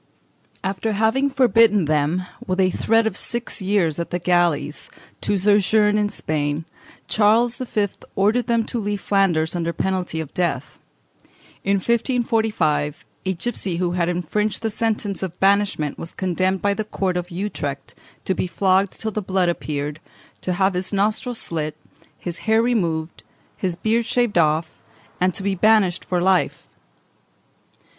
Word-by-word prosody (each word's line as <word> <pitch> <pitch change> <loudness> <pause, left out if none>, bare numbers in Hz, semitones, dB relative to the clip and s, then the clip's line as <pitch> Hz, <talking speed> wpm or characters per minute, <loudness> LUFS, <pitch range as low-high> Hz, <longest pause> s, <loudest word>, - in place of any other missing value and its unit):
After 195 +3 -1
having 225 +7 +2
forbidden 230 - +4
them, 155 +4 +1 0.2
with 185 0 -1
a 185 -1 +4
threat 225 +4 +2
of 220 - -1
six 235 -2 -3
years 185 -5 +1
at 170 - -3
the 175 - -1
galleys, 175 -4 +1 0.3
to 205 - 0
sojourn 210 +2 +3
in 205 0 +1
Spain, 150 -3 -2 0.4
Charles 225 +3 +3
V. 215 -5 0 0.3
ordered 215 +5 +2
them 230 -1 +2
to 240 - -2
leave 205 -1 -2
Flanders 180 -6 +1
under 170 -1 -1
penalty 180 -2 -2
of 155 -3 -6
death. 155 -5 -2 0.8
In 200 +1 +2
1545, 220 - 0 0.2
a 190 - +2
gipsy 190 -3 -3
who 175 0 0
had 175 -1 0
infringed 200 +6 -1
the 225 - 0
sentence 215 -2 -1
of 180 -2 -5
banishment 195 -7 +2
was 165 - -6
condemned 185 +1 0
by 200 0 +3
the 215 - -2
Court 190 -3 -2
of 180 0 -3
Utrecht 170 -7 -4 0.3
to 190 - +1
be 185 - -2
flogged 190 +2 +2
till 220 - -2
the 215 - -2
blood 185 -2 +1
appeared, 150 -3 -3 0.4
to 180 - -1
have 190 +1 +2
his 180 +1 -2
nostrils 215 +4 0
slit, 155 -5 -1 0.4
his 175 -2 -6
hair 220 +1 +4
removed, 170 -9 -1 0.3
his 185 -3 -2
beard 225 +5 0
shaved 240 -7 +2
off, 155 0 +2 0.5
and 185 0 +1
to 195 - -3
be 200 0 +1
banished 195 -2 +3
for 180 - -1
life. 185 +1 +1
190 Hz, 150 wpm, -22 LUFS, 170-215 Hz, 0.8 s, forbidden